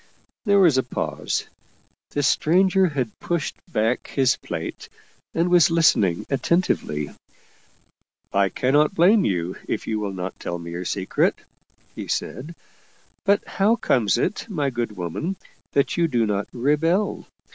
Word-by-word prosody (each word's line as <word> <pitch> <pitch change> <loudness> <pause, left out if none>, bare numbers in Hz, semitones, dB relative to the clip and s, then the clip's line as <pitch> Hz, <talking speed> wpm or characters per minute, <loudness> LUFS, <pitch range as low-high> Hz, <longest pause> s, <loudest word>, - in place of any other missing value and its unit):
There 200 -1 +4
was 170 -9 +5
a - - +4
pause. 125 - -3 0.6
The 145 - -2
stranger 185 +7 +3
had 130 -8 -3
pushed 170 -3 -2 0.2
back 115 -1 0
his 130 -2 +2
plate 80 -1 -6 0.5
and 165 +2 +2
was 175 -2 +6
listening 145 - +3
attentively. 135 - 0 0.6
" - - -41 0.3
I 100 0 +3
cannot 145 - +2
blame 195 +5 +5
you 90 -1 -1
if - - -2
you 110 -1 -1
will 100 -2 -3
not 90 0 -5
tell 85 - -4
me 85 0 -8
your 90 +2 -5
secret/' 95 +1 0 0.5
he - - -7
said. 150 +7 -4 0.3
" - - -36
But 200 +1 +3
how 205 +4 +2
comes 120 - +2
it, 190 - -2
my 145 -8 -1
good 120 -4 -3
woman, 95 - -3 0.4
that 140 +4 +1
you 170 -1 +3
do 120 -7 +1
not 100 -1 -1
rebel? 155 - 0
135 Hz, 145 wpm, -23 LUFS, -, 0.6 s, was